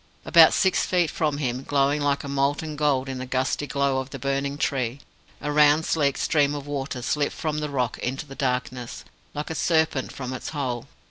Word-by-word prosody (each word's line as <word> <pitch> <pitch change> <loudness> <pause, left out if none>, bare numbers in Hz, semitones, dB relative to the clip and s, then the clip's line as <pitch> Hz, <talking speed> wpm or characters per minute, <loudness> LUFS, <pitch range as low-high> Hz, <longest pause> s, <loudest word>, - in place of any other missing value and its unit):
About 165 -2 +8
six 190 - +2
feet 175 -3 +1
from 150 -3 0
him 130 -3 -2
glowing 140 +1 +1
like 145 -1 +1
molten 140 +3 -1
gold 145 -3 +1
in 130 -1 -4
the 130 - -5
gusty 130 +3 -1
glow 140 0 +1
of 130 0 -5
the - - -7
burning 140 +1 -2
tree 130 -2 -1 0.4
a 150 - -2
round 150 +2 +5
sleek 140 -4 +1
stream 145 -2 +2
of 145 -1 -6
water 135 -3 -4
slipped 145 +2 0
from 155 -1 -2
the 150 0 -3
rock 125 -5 -1
into 135 +5 -3
the 135 - -10
darkness, 125 -6 -3 0.3
like 150 +2 -4
a - - -1
serpent 160 -4 +1
from 130 -2 -5
its 130 - -5
hole. 130 -6 -3
140 Hz, 195 wpm, -25 LUFS, 130-150 Hz, 0.4 s, About